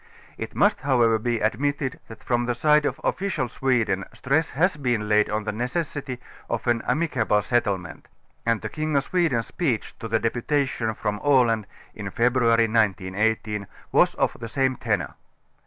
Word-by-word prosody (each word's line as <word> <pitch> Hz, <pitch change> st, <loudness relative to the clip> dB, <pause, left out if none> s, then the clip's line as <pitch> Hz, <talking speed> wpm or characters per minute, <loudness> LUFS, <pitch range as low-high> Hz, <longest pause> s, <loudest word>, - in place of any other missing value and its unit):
It -, -, -7 dB
must 205 Hz, -, +3 dB
however 120 Hz, -5 st, +3 dB
be 120 Hz, 0 st, -1 dB
admitted 135 Hz, +5 st, -1 dB
that 110 Hz, -1 st, -12 dB
from 120 Hz, -1 st, 0 dB
the 120 Hz, -, 0 dB
side 150 Hz, +4 st, +3 dB
of -, -, -4 dB
offi 200 Hz, -, -1 dB
cial 130 Hz, -9 st, -2 dB
Sweden 120 Hz, -8 st, +1 dB
stress 150 Hz, +4 st, +1 dB
has 175 Hz, +3 st, +1 dB
been 120 Hz, -7 st, -1 dB
laid 105 Hz, 0 st, +3 dB
on 105 Hz, 0 st, -1 dB
the -, -, -2 dB
necessity 130 Hz, +2 st, -3 dB, 0.3 s
of -, -, -2 dB
an 120 Hz, -2 st, +2 dB
amicable 125 Hz, -8 st, +1 dB
settlement, 100 Hz, -7 st, -1 dB, 0.4 s
and 115 Hz, -2 st, +1 dB
the 110 Hz, -, -4 dB
King 155 Hz, +2 st, -2 dB
of 140 Hz, -, +3 dB
Sweden's 155 Hz, -10 st, +1 dB
speech 135 Hz, -11 st, -2 dB
to 115 Hz, -, -5 dB
the 115 Hz, 0 st, +2 dB
deputation 120 Hz, 0 st, -1 dB
from 105 Hz, 0 st, -2 dB
Aland 120 Hz, -7 st, +3 dB, 0.3 s
in 105 Hz, -2 st, -6 dB
Febr. 125 Hz, +5 st, +1 dB
1918 110 Hz, -2 st, +1 dB, 0.2 s
was -, -, +4 dB
of -, -, 0 dB
the 115 Hz, -1 st, -6 dB
same 130 Hz, +1 st, +1 dB
tenor. -, -, -1 dB
120 Hz, 165 wpm, -24 LUFS, 110-140 Hz, 0.4 s, was